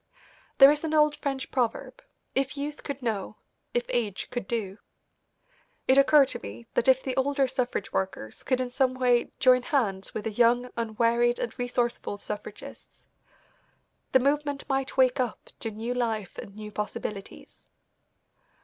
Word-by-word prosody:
There 275 +1 +10
is 300 +1 -2
an 315 -1 -1
old 300 -1 +4
French 270 -2 -3
proverb, 255 - -2 0.3
"If 270 +1 -1
youth 290 +1 -5
could 280 -2 -5
know; 215 -2 -3 0.4
if 240 - +2
age 215 -5 -2
could 245 -6 -4
do." 210 -4 -3 1.1
It 260 - +6
occurred 275 0 +6
to - - -4
me 110 +4 -9
that 235 - +1
if 260 0 +5
the 260 -2 -3
older 275 0 +2
suffrage 250 -5 -2
workers 190 - -3
could 255 -1 0
in 250 -1 -2
some 255 0 +1
way 250 -2 +2
join 255 -1 +5
hands 235 - -1
with 215 - -3
the 225 - -2
young, 240 +3 +3
unwearied 235 +1 +1
and 235 - -3
resourceful 245 -4 -1
suffragists, 205 - -9 1.0
the 260 - +6
movement 285 +1 0
might 270 -1 -2
wake 260 0 +4
up 250 -3 -3
to 225 - -2
new 225 +3 -4
life 225 -5 -2
and 200 - -9
new 210 0 -8
possibilities. 210 -1 -6
245 Hz, 155 wpm, -27 LUFS, 220-270 Hz, 1.1 s, There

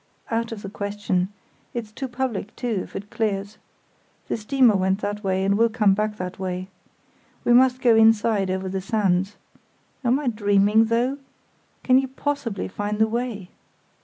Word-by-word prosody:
"Out 230 0 -1
of 215 -2 -7
the 195 - -5
question; 200 -3 -1 0.5
it's 225 -3 -4
too 265 +4 -5
public, 245 -4 -3
too, 235 -5 -2
if - - -11
it 205 +1 -7
clears. 205 -1 -2 0.7
The - - 0
steamer 235 0 +3
went 190 +1 +1
that 205 +1 -3
way, 190 -1 0
and 200 +1 +2
will 230 +2 +3
come 215 -3 +3
back 210 +1 -1
that 180 0 -6
way. 185 0 -4 0.7
We 240 - +3
must 255 +1 +4
go 235 -3 +5
inside 220 -3 +4
over 190 0 -2
the 190 0 -3
sands. 195 -1 0 0.7
Am 250 +3 +2
I 295 - -5
dreaming, 210 -1 +3
though? 240 +5 0 0.6
Can 255 0 +5
you 265 - -1
possibly 265 -6 -3
find 205 +2 -3
the 220 - +4
way?" 225 -5 -4
210 Hz, 165 wpm, -23 LUFS, 195-235 Hz, 0.7 s, go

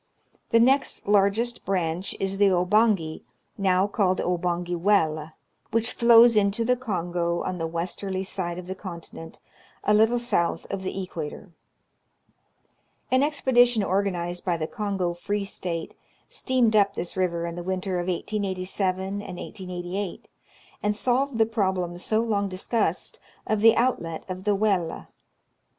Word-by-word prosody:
The 230 - +5
next 265 0 +2
largest 205 +4 +2
branch 180 -1 -1
is 195 0 -2
the 205 - +6
Obangi, 185 -2 +2 0.3
now 190 -1 +2
called 195 -3 +1
the - - -1
Obangi 175 0 -1
Welle, 160 -5 +1 0.4
which 230 +1 0
Hows 235 0 +8
into 210 +2 +2
the 250 +2 +3
Kongo 175 -7 -2
on 185 -1 -3
the 165 - -1
westerly 185 +3 -3
side 175 -2 -3
of 180 - -7
the 185 - -4
conti 180 -3 -9
nent, 165 0 -10 0.5
a 210 - +3
little 220 +3 +4
south 225 -8 0
of 195 - -3
the 190 +1 -4
equator. 170 0 -7 1.6
An 260 +1 +4
expedition 245 -6 +3
organized 180 -3 -1
by 175 -3 0
the 155 - -2
Kongo 195 -3 -2
Free 200 +4 -3
State 170 -4 -4 0.3
steamed 245 -4 +1
up 200 -1 +4
this 175 - -4
river 170 -2 0
in 170 - -4
the 175 - -5
winter 185 0 -2
of 175 - -3
1887 185 0 -1 0.2
and 180 - -8
1888, 180 0 -5 0.5
and 210 0 0
solved 255 +3 0
the 225 - +5
problem 190 -6 -1
so 215 +4 +1
long 205 -3 0
discussed, 190 +5 -1 0.3
of 215 -1 0
the 225 +1 +7
outlet 170 -10 0
of 185 +1 -6
the 205 -1 +3
Welle. 195 -5 0
195 Hz, 145 wpm, -25 LUFS, 175-215 Hz, 1.6 s, Hows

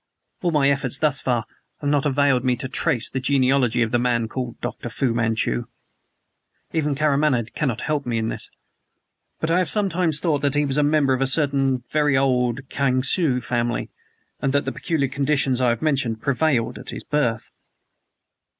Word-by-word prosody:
All 175 - +1
my 150 -4 +2
efforts 140 -1 0
thus 145 -2 +1
far 120 -4 0 0.3
have 145 - -4
not 145 0 +2
availed 140 -2 +2
me 125 -1 +2
to 125 +2 -4
trace 125 -2 +2
the 130 - -3
genealogy 130 -3 +2
of 115 - -3
the 120 - +2
man 120 -2 0
called 125 +1 -5
Dr. 120 - -5
Fu 120 +1 -1
Manchu. 115 +1 0 1.1
Even 150 -3 0
Karamaneh 140 -5 +1
cannot 135 -8 -2
help 150 -3 -2
me 120 -1 -1
in 110 0 -1
this. - - -4 0.9
But 160 - -1
I 175 - +3
have 185 - 0
sometimes 180 -7 +1
thought 150 -5 0
that 140 0 0
he 145 0 +2
was 140 +1 0
a - - +4
member 145 -2 +2
of 130 - -1
a 135 - +2
certain 135 -3 +1
very 150 -2 +2
old 130 -1 0
Kiangsu 130 +1 +2
family 120 -1 -2 0.5
and 135 - 0
that 145 - +1
the - - -2
peculiar 160 -5 -1
conditions 135 -1 0
I 125 - +3
have 120 +2 -1
mentioned 130 -7 0
prevailed 135 -2 0
at - - -9
his - - -6
birth!" 120 -7 -1
135 Hz, 180 wpm, -22 LUFS, 125-145 Hz, 1.1 s, a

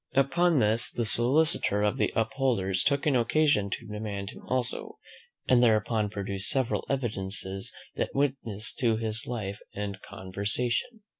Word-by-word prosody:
Upon 160 +5 +3
this, 110 -1 +2
the 120 - -2
solicitor 120 -2 +4
of 105 - +1
the 105 - +1
Upholders 110 -5 0
took 140 -1 +1
an 145 -3 +3
occasion 120 -3 +2
to 115 - -5
demand 105 -2 -5
him - - -13
also, 130 -2 -1 0.5
and 125 -1 +5
thereupon 110 -2 +2
produced 100 -1 -2
several 130 -3 0
evidences 95 -6 -3 0.3
that - - -2
witnessed 130 -6 0
to 115 -5 +2
his 110 -1 -2
life 105 -4 -4 0.2
and 100 -1 -5
conversation. 115 - -3
115 Hz, 140 wpm, -28 LUFS, 100-130 Hz, 0.5 s, and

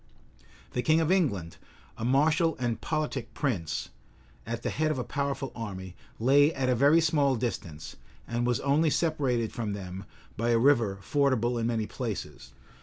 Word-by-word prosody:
The 125 - -1
king 160 +4 +3
of 165 +1 +1
England, 100 - 0 0.4
a - - -7
martial 150 +6 +3
and 120 -2 -2
politic 150 -5 -3
prince, 85 - -2 0.6
at 115 0 -4
the - - -1
head 155 0 0
of 155 - -1
a 125 - -1
powerful 140 -1 -3
army, 95 -5 -6 0.2
lay 140 +6 +5
at 130 -1 0
a - - +4
very 145 +6 +5
small 150 -4 +2
distance, 95 -10 -5 0.3
and 120 +1 -1
was 120 -2 +1
only 150 +3 +3
separated 140 -8 0
from 110 -4 -3
them 95 -1 -7 0.3
by 115 +2 0
a 115 - +4
river 115 -6 +3
fordable 125 -4 +1
in 115 - 0
many 115 -2 0
places. - - -6
125 Hz, 165 wpm, -28 LUFS, 115-145 Hz, 0.6 s, lay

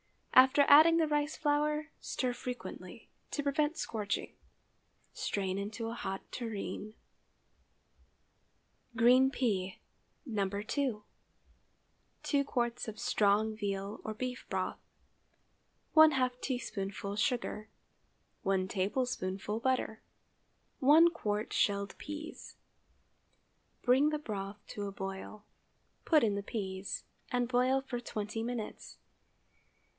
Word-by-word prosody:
After 265 +2 +7
adding 315 +3 +8
the 320 -1 +3
rice 295 0 0
flour, 300 +1 +1
stir 250 -1 -2
frequently, 250 0 -7 0.2
to 290 - -2
prevent 295 +3 +1
scorching. 210 -4 -3 0.8
Strain 195 -1 -2
into 220 +3 -4
a - - -4
hot 195 -4 -4
tureen. 215 -2 -5 2.0
GREEN 250 +3 +6
PEA 200 -8 -1 0.5
(No. 205 -7 -1
2.) 210 +3 -2 1.2
2 285 -2 +2
qts. 240 -4 -1
of 220 0 -6
strong 215 +1 +2
veal 200 -1 -3
or 220 - -4
beef 250 +2 -4
broth. - - -2 1.2
½ 265 -6 +5
teaspoonful 200 -6 -3
sugar. 220 -2 -1 0.7
1 190 -1 +1
tablespoonful 200 0 -1
butter. 250 -3 0 0.8
1 320 +5 +7
qt. 210 -3 -2
shelled 200 -1 +1
peas. 300 +2 -7 1.3
Bring 265 +4 +5
the 305 - -1
broth 205 -6 -6
to 205 -1 -4
a - - -5
boil; 195 +2 -7 0.6
put 310 -5 +5
in 215 -3 +3
the 200 - -2
peas, 195 -2 -4 0.3
and 245 -1 +1
boil 255 +2 +2
for 255 -2 -4
twenty 215 -2 -4
minutes. 235 -2 -5
230 Hz, 105 wpm, -32 LUFS, 205-265 Hz, 2.0 s, adding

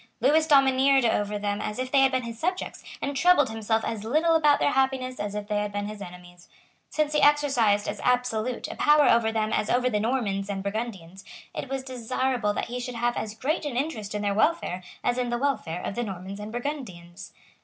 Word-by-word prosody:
Lewis 310 +6 +3
domineered 270 -2 +4
over 210 -2 0
them 205 0 -2
as 210 - -4
if 255 0 -3
they 275 - +4
had 270 0 +5
been 260 -1 0
his 230 -1 -7
subjects, 365 +2 -3 0.2
and 280 0 -2
troubled 290 -4 +4
himself 220 0 -1
as 220 -2 -4
little 310 +9 +2
about 300 -3 +4
their - - +1
happiness 265 -1 0
as 205 0 -4
if 210 -1 -4
they 210 -1 0
had 210 0 -2
been 205 0 -3
his 210 -1 -8
enemies. 175 -1 -12 0.4
Since 305 -1 0
he 300 - +2
exercised 270 -9 +3
as - - -4
absolute 250 -1 0
a - - -6
power 295 -2 +4
over 230 -1 +4
them 220 -1 -1
as 210 - 0
over 250 +1 +2
the 210 - +1
Normans 205 -4 -1
and 195 -1 -3
Burgundians, 200 -4 -5 0.3
it 275 - -5
was 270 -1 -3
desirable 255 -2 -1
that - - -1
he 245 +1 -5
should 245 0 -5
have 240 +1 0
as 215 0 -4
great 295 +9 -1
an 285 -5 -3
interest 225 -8 -3
in 210 - -2
their 200 -1 +1
welfare 210 - +1 0.2
as 245 +1 +1
in 245 -1 -1
the 240 - 0
welfare 240 -11 -2
of - - -3
the 240 - -2
Normans 195 -1 -6
and 210 +1 -7
Burgundians. 200 - -6
235 Hz, 220 wpm, -26 LUFS, 205-270 Hz, 0.4 s, had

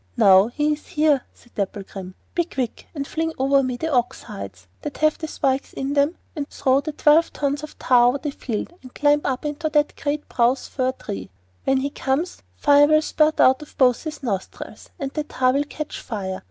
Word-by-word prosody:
'Now 190 +1 +7
he 295 +5 0
is 300 - -9
here!' 300 -3 +2
said 240 - -24
Dapplegrim. 195 -2 -5 0.2
'Be 345 - +1
quick, 255 -8 -4
and 280 -2 -3
fling 325 0 -2
over 275 +1 +3
me 255 -2 -2
the 320 +4 -2
ox 245 -1 0
hides 95 -2 -9 0.2
that 295 - -6
have 310 0 +2
the 315 - -4
spikes 275 -3 -1
in 270 +1 -3
them, 285 +4 +2 0.3
throw 265 0 +2
the 310 +2 -4
twelve 305 +2 +4
tons 285 0 -1
of 305 - -9
tar 245 -1 +5
over 250 +3 +2
the 295 +1 -4
field, 240 +2 -4
and 255 -1 -14
climb 295 0 +3
up 260 +1 -2
into 295 +2 -2
that 295 -1 +2
great 295 +1 -1
spruce 245 +2 +1
fir 255 -1 -1
tree. 95 - -7 0.4
When 270 - +3
he 280 +1 -2
comes, 280 +7 -2
fire 290 0 +5
will 310 +1 +4
spurt 310 0 +2
out 260 +3 +5
of 300 - -13
both 250 -4 +4
his 305 -2 -6
nostrils, 195 -7 -5
and 275 -1 -4
then 305 0 -3
the - - -32
tar 255 0 +3
will 285 +2 +1
catch 305 0 -6
fire. 190 -4 -4
275 Hz, 205 wpm, -23 LUFS, 250-300 Hz, 0.4 s, Now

